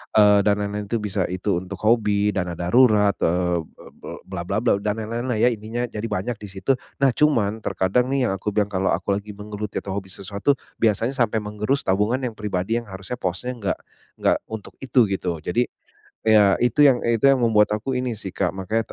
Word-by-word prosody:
eee, 105 Hz, -1 st, +6 dB
dan 105 Hz, 0 st, +2 dB
lain-lain 105 Hz, 0 st, -3 dB
itu 115 Hz, -, +1 dB
bisa 105 Hz, -2 st, -1 dB
itu 95 Hz, +2 st, -1 dB
untuk 95 Hz, +1 st, -8 dB
hobi, 105 Hz, -2 st, +2 dB
dana 90 Hz, -2 st, -1 dB
darurat, 105 Hz, +2 st, +4 dB
eee, 90 Hz, 0 st, +1 dB
be -, -, -18 dB, 0.2 s
be -, -, -8 dB
bla -, -, -5 dB
bla 100 Hz, -, -1 dB
bla, 115 Hz, -1 st, +2 dB
dan 105 Hz, +1 st, -1 dB
lain-lainlah 115 Hz, +2 st, -2 dB
ya 115 Hz, -, +5 dB
intinya, 115 Hz, +3 st, -4 dB
jadi 110 Hz, 0 st, -5 dB
banyak 105 Hz, +4 st, -2 dB
di 105 Hz, -, -7 dB
situ. 95 Hz, +7 st, 0 dB, 0.3 s
Nah 135 Hz, -1 st, +5 dB
cuman, 115 Hz, -8 st, +2 dB
terkadang 100 Hz, +6 st, 0 dB
nih 135 Hz, -1 st, +1 dB
yang 95 Hz, -, 0 dB
aku 95 Hz, +2 st, -3 dB
bilang 105 Hz, 0 st, +1 dB
kalau 95 Hz, -1 st, 0 dB
aku 95 Hz, +3 st, 0 dB
lagi 100 Hz, +1 st, -4 dB
menggeluti 105 Hz, 0 st, -6 dB
atau 95 Hz, -, -4 dB
hobi 95 Hz, -1 st, -6 dB
sesuatu, 100 Hz, +9 st, -1 dB, 0.2 s
biasanya 115 Hz, +3 st, +2 dB
sampai 120 Hz, -4 st, +1 dB
menggerus 105 Hz, +6 st, -1 dB
tabungan 105 Hz, +6 st, +2 dB
yang 125 Hz, -3 st, -3 dB
pribadi 105 Hz, 0 st, -2 dB
yang 115 Hz, -, -15 dB
harusnya 95 Hz, +5 st, -6 dB
posnya 95 Hz, +8 st, -2 dB
enggak 110 Hz, -6 st, -2 dB, 0.4 s
enggak -, -, +2 dB
untuk 110 Hz, -2 st, -7 dB
itu 130 Hz, -3 st, +3 dB
gitu. 90 Hz, -3 st, -2 dB
Jadi, 120 Hz, +10 st, 0 dB, 0.6 s
iya 105 Hz, -3 st, +6 dB
itu 120 Hz, +4 st, +3 dB
yang 130 Hz, -3 st, +4 dB
itu 115 Hz, -2 st, +1 dB
yang 135 Hz, -1 st, +5 dB
membuat 110 Hz, -3 st, +4 dB
aku 120 Hz, +5 st, -3 dB
ini 125 Hz, -2 st, -2 dB
sih 95 Hz, -, -6 dB
Kak, 90 Hz, -3 st, 0 dB
makanya 110 Hz, +4 st, -2 dB
105 Hz, 205 wpm, -23 LUFS, 95-115 Hz, 0.6 s, eee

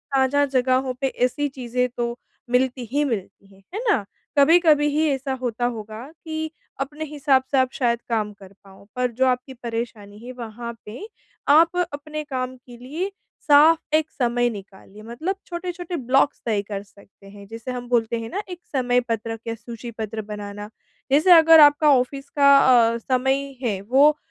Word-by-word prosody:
साझा 270 Hz, +2 st, +3 dB
जगहों 260 Hz, -1 st, +1 dB
पे 270 Hz, -, +2 dB
ऐसी 260 Hz, +3 st, -1 dB
चीज़ें 250 Hz, -1 st, -2 dB
तो, 235 Hz, 0 st, -2 dB, 0.3 s
मिलती 250 Hz, 0 st, 0 dB
ही 290 Hz, +2 st, +1 dB
मिलती 200 Hz, -5 st, -5 dB
हैं, 195 Hz, 0 st, -22 dB
है 415 Hz, -, -3 dB
ना? 225 Hz, -, +2 dB, 0.3 s
कभी-कभी 305 Hz, 0 st, +5 dB
ही 315 Hz, 0 st, +3 dB
ऐसा 270 Hz, -1 st, -2 dB
होता 240 Hz, -1 st, -2 dB
होगा 220 Hz, -1 st, -5 dB, 0.2 s
कि 315 Hz, 0 st, -4 dB, 0.3 s
अपने 290 Hz, +3 st, -4 dB
हिसाब 280 Hz, -3 st, +1 dB
से 275 Hz, -, +2 dB
आप 260 Hz, -1 st, +2 dB
शायद 235 Hz, -2 st, 0 dB
काम 215 Hz, -3 st, -1 dB
कर 195 Hz, -1 st, -16 dB
पाओ। 195 Hz, 0 st, -17 dB
पर 250 Hz, -1 st, 0 dB
जो 255 Hz, +3 st, +1 dB
आपकी 255 Hz, +1 st, -1 dB
परेशानी 230 Hz, -4 st, -6 dB
है, 255 Hz, -, -7 dB
वहाँ 235 Hz, -1 st, -7 dB
पे 235 Hz, -, -8 dB, 0.4 s
आप 330 Hz, +4 st, +5 dB, 0.2 s
अपने 305 Hz, +1 st, -6 dB
काम 255 Hz, -3 st, -4 dB
के 245 Hz, -1 st, -15 dB
लिए 305 Hz, +11 st, -5 dB, 0.4 s
साफ़ 305 Hz, +2 st, +6 dB, 0.2 s
एक 315 Hz, 0 st, +1 dB
समय 245 Hz, -1 st, 0 dB
निकालिए 200 Hz, -1 st, -11 dB
मतलब 250 Hz, -, -4 dB
छोटे-छोटे 350 Hz, 0 st, -5 dB
ब्लॉक्स 270 Hz, 0 st, +1 dB
तय 215 Hz, -4 st, 0 dB
कर 200 Hz, -1 st, -6 dB
सकते 200 Hz, 0 st, -20 dB
हैं, 200 Hz, 0 st, -13 dB
जिसे 230 Hz, +4 st, -7 dB
हम 245 Hz, -1 st, -6 dB
बोलते 235 Hz, -1 st, +1 dB
हैं 225 Hz, 0 st, -6 dB
ना, 400 Hz, -, -3 dB
एक 360 Hz, -1 st, -7 dB, 0.2 s
समय-पत्रक 240 Hz, -3 st, -1 dB
या 230 Hz, -, -2 dB
सूची-पत्र 225 Hz, -1 st, -7 dB
बनाना। 205 Hz, 0 st, -8 dB, 0.4 s
जैसे 310 Hz, +7 st, +4 dB
अगर 325 Hz, -1 st, +8 dB
आपका 295 Hz, 0 st, +6 dB
ऑफिस 275 Hz, +2 st, -2 dB
का 280 Hz, -1 st, +5 dB, 0.4 s
अ, -, -, -2 dB
समय 265 Hz, +3 st, -1 dB
है 215 Hz, -7 st, -1 dB
वो 275 Hz, +8 st, +4 dB
250 Hz, 170 wpm, -23 LUFS, 230-285 Hz, 0.4 s, अगर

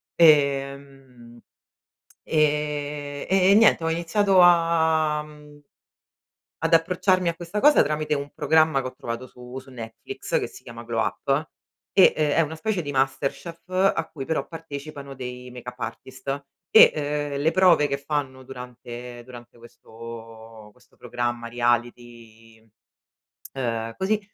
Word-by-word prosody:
Ehm, 140 Hz, -5 st, +1 dB, 0.8 s
e 150 Hz, -1 st, -1 dB
e 190 Hz, 0 st, +4 dB
niente, 220 Hz, -6 st, +5 dB
ho 165 Hz, -, 0 dB
iniziato 185 Hz, +4 st, +1 dB
a, 160 Hz, -3 st, +3 dB
mhmm, 150 Hz, -1 st, -15 dB, 1.1 s
ad -, -, +1 dB
approcciarmi 180 Hz, +2 st, +3 dB
a 170 Hz, -, -3 dB
questa 175 Hz, +5 st, -5 dB
cosa 295 Hz, +1 st, +6 dB
tramite 150 Hz, 0 st, -1 dB
un 140 Hz, 0 st, -5 dB
programma 155 Hz, -2 st, +3 dB
che 130 Hz, -, -5 dB
ho 130 Hz, -, -8 dB
trovato 115 Hz, +2 st, -6 dB
su 125 Hz, +1 st, -11 dB
su 130 Hz, -, -16 dB
Netflix 115 Hz, -3 st, -5 dB
che -, -, -3 dB
si -, -, -14 dB
chiama 115 Hz, 0 st, -10 dB
Glow 115 Hz, -1 st, -2 dB
Up 145 Hz, +3 st, -1 dB, 0.4 s
e 190 Hz, -, +7 dB
è 155 Hz, +1 st, +2 dB
una 160 Hz, 0 st, -3 dB
specie 200 Hz, +1 st, -1 dB
di 145 Hz, -, -5 dB
MasterChef 135 Hz, +6 st, -2 dB
a 185 Hz, -3 st, +1 dB
cui 135 Hz, -4 st, -6 dB
però 160 Hz, -, -1 dB
partecipano 145 Hz, -3 st, -8 dB
dei 125 Hz, -1 st, -7 dB
make-up 125 Hz, 0 st, -9 dB
artist 130 Hz, +4 st, -6 dB, 0.2 s
e 145 Hz, -7 st, +4 dB
le 150 Hz, +3 st, +1 dB
prove 175 Hz, -6 st, +4 dB
che 140 Hz, -, -2 dB
fanno 140 Hz, -2 st, -4 dB
durante 125 Hz, -1 st, -9 dB
durante 120 Hz, -1 st, -13 dB
questo 115 Hz, -1 st, -12 dB
questo -, -, -27 dB
programma, 120 Hz, -1 st, -3 dB
reality, 120 Hz, -2 st, -3 dB, 0.8 s
ehm, 115 Hz, -3 st, -3 dB
così, 210 Hz, +3 st, 0 dB
140 Hz, 130 wpm, -24 LUFS, 120-160 Hz, 1.1 s, e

